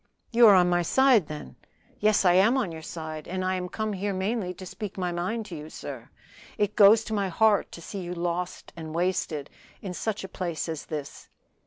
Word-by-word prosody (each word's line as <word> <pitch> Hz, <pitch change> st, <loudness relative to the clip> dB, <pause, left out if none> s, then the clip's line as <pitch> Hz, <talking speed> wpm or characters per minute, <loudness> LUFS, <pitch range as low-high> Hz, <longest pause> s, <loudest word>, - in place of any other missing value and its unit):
"You 235 Hz, 0 st, +7 dB
are 205 Hz, -, +8 dB
on 180 Hz, -1 st, +5 dB
my 175 Hz, 0 st, +2 dB
side, 245 Hz, -, +4 dB
then?" 65 Hz, -3 st, -8 dB, 0.4 s
"Yes, 210 Hz, -1 st, +3 dB
I 175 Hz, -, +6 dB
am 205 Hz, +8 st, +5 dB
on 225 Hz, -10 st, -1 dB
your 160 Hz, -1 st, -8 dB
side, 155 Hz, -1 st, -7 dB
and 185 Hz, +1 st, -3 dB
I 185 Hz, -, +1 dB
am 180 Hz, -1 st, -3 dB
come 215 Hz, +1 st, -3 dB
here 200 Hz, 0 st, -2 dB
mainly 190 Hz, 0 st, -1 dB
to 185 Hz, -, -9 dB
speak 200 Hz, +2 st, -7 dB
my 180 Hz, -2 st, -1 dB
mind 185 Hz, +6 st, -2 dB
to 180 Hz, -, -8 dB
you. 155 Hz, 0 st, -8 dB
Sir, -, -, -8 dB, 0.5 s
it 205 Hz, 0 st, 0 dB
goes 215 Hz, +1 st, +7 dB
to 220 Hz, -, -5 dB
my 200 Hz, -2 st, 0 dB
heart 210 Hz, +3 st, +3 dB
to 170 Hz, -, -9 dB
see 200 Hz, -, -6 dB
you 175 Hz, 0 st, -5 dB
lost 175 Hz, +1 st, -3 dB
and 160 Hz, -1 st, -7 dB
wasted 170 Hz, -5 st, -1 dB, 0.3 s
in 190 Hz, -3 st, -6 dB
such 215 Hz, +3 st, -3 dB
a -, -, -5 dB
place 175 Hz, -4 st, -4 dB
as 160 Hz, -2 st, -5 dB
this." 150 Hz, -3 st, -7 dB
185 Hz, 215 wpm, -27 LUFS, 170-210 Hz, 0.5 s, are